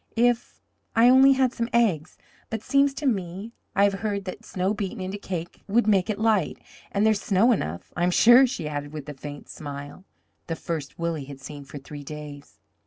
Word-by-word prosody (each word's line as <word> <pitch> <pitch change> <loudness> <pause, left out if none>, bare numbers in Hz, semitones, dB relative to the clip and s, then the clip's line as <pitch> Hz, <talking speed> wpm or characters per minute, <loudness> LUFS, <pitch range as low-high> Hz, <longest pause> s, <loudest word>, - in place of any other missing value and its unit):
If 240 0 +1 0.4
I 230 +2 +6
only 265 +2 +7
had 260 -1 +2
some 235 0 -2
eggs 190 -10 +1 0.3
but 225 -1 -4
seems 280 0 +3
to 285 - -5
me 195 -2 -2 0.2
I 200 - +4
have 200 0 +4
heard 200 -3 -2
that 185 - -7
snow 190 +2 -1
beaten 205 +1 -4
into 190 +2 -4
cake 175 -4 -6
would 225 +3 +3
make 200 -2 +3
it 210 - -1
light 215 -6 +1 0.3
and 205 +1 +1
there's 215 -1 +3
snow 220 +3 +3
enough, 85 - -3
I'm 175 +1 +2
sure," 240 +8 +7
she 235 - -4
added 145 0 -5
with 150 -2 -7
a - - -5
faint 145 +1 -9
smile, 145 +3 -8 0.4
the 165 - -2
first 160 -4 -5
Willie 165 -4 -2
had 140 -1 -10
seen 140 +1 -9
for 145 - -9
three 145 +1 -9
days. 145 -1 -9
190 Hz, 195 wpm, -25 LUFS, 150-225 Hz, 0.4 s, only